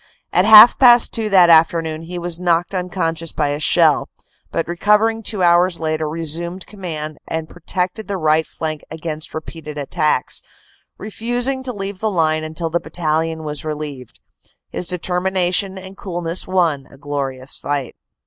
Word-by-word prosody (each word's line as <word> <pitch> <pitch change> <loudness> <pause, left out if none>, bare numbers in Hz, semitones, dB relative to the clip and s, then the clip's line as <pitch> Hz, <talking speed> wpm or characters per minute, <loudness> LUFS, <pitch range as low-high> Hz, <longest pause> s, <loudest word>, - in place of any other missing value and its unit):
At 180 - +4
half 220 +2 +9
past 240 -2 +7
two 220 -2 -2
that 180 -4 +6
afternoon 160 -1 +3
he 175 +2 -7
was 175 -1 -3
knocked 175 0 0
unconscious 175 -3 -2
by 150 -2 -1
a 145 +1 -2
shell, 150 - +3 0.4
but 165 - -2
recovering 210 +6 +2
two 210 -3 -1
hours 175 0 +3
later 155 -1 -2
resumed 165 +3 -4
command 155 -7 -6
and 160 -1 -4
protected 180 +4 -4
the 200 - -3
right 155 -1 +2
flank 155 -2 -5
against 160 -1 -6
re 155 - -3
peated 150 -2 -10
attacks, 145 -1 -1 0.6
refusing 245 +5 -2
to 260 -1 -4
leave 195 -3 -6
the 220 - 0
line 155 -4 +1
until 160 +1 -4
the 170 - +1
battalion 160 -1 -2
was 150 -1 -4
relieved. 150 -5 -7 0.5
His 180 - -2
determination 180 +2 0
and 190 +1 -10
coolness 175 -3 -1
won 170 -7 0
a 140 - -17
glorious 135 -2 -4
fight. 140 -3 -4
170 Hz, 155 wpm, -19 LUFS, 155-190 Hz, 0.6 s, half